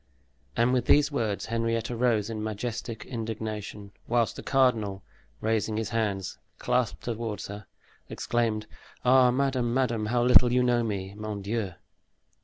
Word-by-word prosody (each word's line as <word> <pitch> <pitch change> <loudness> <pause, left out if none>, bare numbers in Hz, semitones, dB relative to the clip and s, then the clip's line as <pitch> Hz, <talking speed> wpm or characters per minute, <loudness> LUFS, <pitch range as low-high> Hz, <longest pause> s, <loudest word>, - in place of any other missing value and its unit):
And 120 +2 +3
with 125 -2 +1
these 145 0 +4
words 110 -7 -1
Henrietta 115 +1 -1
rose 115 -4 +2
in 110 -1 -4
majestic 110 +1 -4
indignation, 110 -3 -5 0.2
whilst 120 -1 +1
the - - -7
cardinal, 110 -8 +1 0.4
raising 110 -1 0
his 110 -1 -2
hands 105 -5 -2 0.2
clasped 125 -2 0
toward 115 -3 -3
her, 100 0 -8 0.4
exclaimed, 115 -3 -1 0.4
"Ah, 125 0 +6
madame, 125 -2 +1
madame, 120 -5 +1
how 120 +2 +2
little 125 0 +7
you 125 0 +3
know 120 -1 +3
me, 100 -3 -3
mon 105 -1 -5
Dieu!" 100 -2 -2
115 Hz, 140 wpm, -28 LUFS, 105-120 Hz, 0.4 s, little